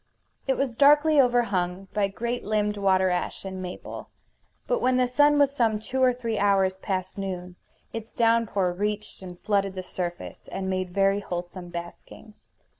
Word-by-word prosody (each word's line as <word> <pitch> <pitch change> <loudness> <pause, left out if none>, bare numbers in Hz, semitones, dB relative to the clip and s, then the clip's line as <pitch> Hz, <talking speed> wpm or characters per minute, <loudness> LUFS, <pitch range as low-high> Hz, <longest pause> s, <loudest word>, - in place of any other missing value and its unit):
It 265 - +1
was 265 -4 -1
darkly 295 +1 +6
overhung 195 -7 0
by 205 -1 +2
great 235 +5 -3
limbed 210 0 0
water 190 -2 +2
ash 180 +2 -3
and 190 -1 -5
maple; 180 -1 -7 0.6
but - - 0
when 255 0 +3
the 250 -1 +3
sun 290 +4 +4
was 280 -1 +3
some 225 -5 +2
two 250 +5 -3
or 255 -1 +6
three 235 -3 -3
hours 195 -2 +2
past 190 0 -3
noon 180 -2 -5 0.4
its 225 0 -6
downpour 225 -6 +2
reached 210 +3 -3
and 180 -2 -9
flooded 200 -2 0
the 185 - -4
surface 175 -1 -6
and 190 0 -3
made 185 -1 -2
very 195 +2 +2
wholesome 175 -1 -6
basking. 175 +5 -9
200 Hz, 165 wpm, -26 LUFS, 185-235 Hz, 0.6 s, darkly